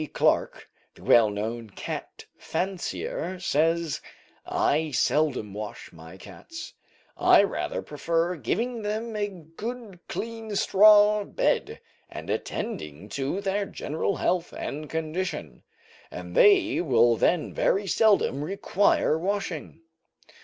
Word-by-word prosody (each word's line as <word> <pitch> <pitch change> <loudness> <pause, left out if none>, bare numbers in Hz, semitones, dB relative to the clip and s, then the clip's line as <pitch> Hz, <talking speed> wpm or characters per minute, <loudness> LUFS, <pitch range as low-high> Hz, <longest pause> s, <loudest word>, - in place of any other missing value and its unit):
Clarke, - - +1 0.3
the - - -16
well 115 -3 +6
known 110 +2 -4
cat - - -7
fancier, 185 -1 -3
says: 165 -1 +1 0.5
"I 155 +2 +1
seldom 130 -5 +1
wash 105 -2 -7
my 80 +2 -12
cats, 315 - -10 0.4
I - - +6
rather - - -2
prefer 170 +2 -1
giving 225 - -2
them 215 +2 -3
a 205 -1 0
good 195 +4 -8
clean 225 -2 -5
straw 210 +1 +6
bed, - - -1 0.3
and - - -6
attending 75 +7 -4
to 140 - -2
their 200 +1 -1
general 160 +6 -2
health 175 -2 -1
and 150 +1 -5
condition, 160 +4 -4 0.5
and - - -8
they 400 - +5
will 120 -7 +4
then 165 +7 +1
very 200 +1 +1
seldom 195 - +2
require 190 -2 +1
washing. 180 -4 -3
175 Hz, 110 wpm, -26 LUFS, 145-205 Hz, 0.5 s, well